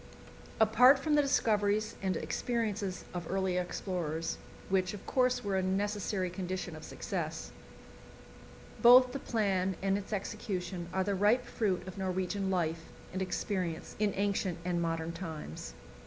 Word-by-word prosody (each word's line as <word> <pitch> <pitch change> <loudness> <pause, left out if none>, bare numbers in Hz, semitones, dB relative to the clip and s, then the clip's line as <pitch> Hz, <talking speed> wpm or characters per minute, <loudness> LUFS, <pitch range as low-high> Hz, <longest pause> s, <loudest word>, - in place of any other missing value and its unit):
Apart 230 +5 +7
from 295 +3 -1
the 295 - +6
discoveries 215 -6 +1
and 190 -3 0
experiences 210 +2 -2
of 175 -2 -5
earlier 190 -1 +1
explorers 170 -3 -3 0.3
which, 190 +1 +1
of 200 - -11
course, 250 -1 +2
were 200 -2 -1
a - - +2
necessary 195 -1 -1
condition 185 -2 -4
of 155 - -10
success - - -4 1.3
both 250 +1 +8
the 275 - -4
plan 195 -6 0
and 195 +1 +1
its 200 - -10
execution 190 -4 -3
are 190 0 +1
the 200 +1 0
ripe 210 +6 +3
fruit 195 -5 -1
of 185 +1 -7
Norwegian 190 +1 -1
life 165 -3 0 0.3
and 190 - -2
experience 185 -3 -2
in 210 -1 +2
ancient 195 -3 0
and 175 -1 0
modern 165 0 -1
times. 160 - -7
190 Hz, 140 wpm, -32 LUFS, 180-210 Hz, 1.3 s, both